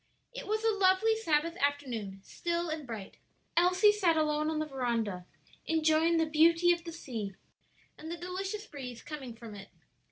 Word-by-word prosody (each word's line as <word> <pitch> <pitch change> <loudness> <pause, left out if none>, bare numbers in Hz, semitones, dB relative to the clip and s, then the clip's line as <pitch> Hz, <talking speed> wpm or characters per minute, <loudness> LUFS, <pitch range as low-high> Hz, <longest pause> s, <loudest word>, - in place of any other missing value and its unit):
It - - -7
was 435 +1 -1
a 450 - +4
lovely 380 +4 +4
Sabbath 335 -6 +1
afternoon, 245 -9 -2
still 340 +5 -2
and 310 -3 -4
bright; 215 -5 -7 0.4
Elsie 365 +4 +5
sat 365 -6 +2
alone 305 0 +1
on 315 - -1
the 310 - 0
veranda, 230 -10 -2 0.4
enjoying 320 +1 +3
the 325 - +3
beauty 330 +3 +5
of 340 -1 0
the 335 - -5
sea 225 - -6 0.6
and 315 - -8
the 340 - -4
delicious 380 +4 -4
breeze 250 - -8
coming 270 -6 -7
from 225 -2 -10
it. 200 -1 -10
315 Hz, 165 wpm, -31 LUFS, 250-345 Hz, 0.6 s, Elsie